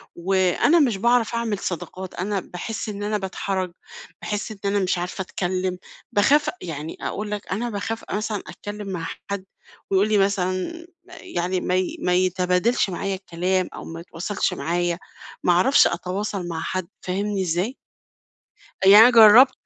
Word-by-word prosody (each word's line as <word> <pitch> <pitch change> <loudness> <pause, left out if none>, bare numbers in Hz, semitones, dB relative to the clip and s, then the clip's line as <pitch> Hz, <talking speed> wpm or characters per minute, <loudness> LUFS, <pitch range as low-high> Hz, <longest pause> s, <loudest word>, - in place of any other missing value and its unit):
وأنا 190 - +3
مش 240 -9 +2
باعرف 235 +1 +2
أعمل 230 -3 -1
صداقات، 185 +1 -5
أنا 195 +2 -2
باحس 195 +5 -6
إن 205 -1 -5
أنا 210 +1 0
باتحرج، 190 -1 -3 0.5
باحس 210 +2 -3
إن 215 - -8
أنا 200 0 +2
مش 185 -1 0
عارفة 180 +2 -4
أتكلم، 185 0 -2 0.3
باخاف 290 +9 +4
أ - - -5
يعني 160 -2 -6
أقول 210 0 -4
لك 210 -1 -4
أنا 230 +6 -1
باخاف 220 +1 -4
أ - - -5
مثلًا 210 -1 -2
أتكلم 205 -1 -7
مع 170 -3 -4 0.2
حد 200 -1 -3 0.4
ويقول 195 +2 +3
لي 215 - +3
مثلًا 195 - -1 0.2
يعني 185 - -3
ما 180 - 0
ي 185 -1 -1
ما 180 - +1
يتبادلش 185 +4 +2
معايا 195 +2 -2
الكلام 185 0 -1
أو - - -8
ما 165 0 -7
يتواصلش 180 +4 -2
معايا. 175 0 -1 0.4
ما - - +4
أعرفش 250 +11 +5
أتواصل 195 0 -3
مع 165 -2 -4
حد، 185 -2 -3
فاهمني 200 +2 -2
إزاي؟ 180 +8 -1 1.1
أ 190 - +1
يعني 205 +2 +10
أنا 235 +3 +9
جرّبت 235 +3 +8
195 Hz, 160 wpm, -23 LUFS, 180-210 Hz, 1.1 s, يعني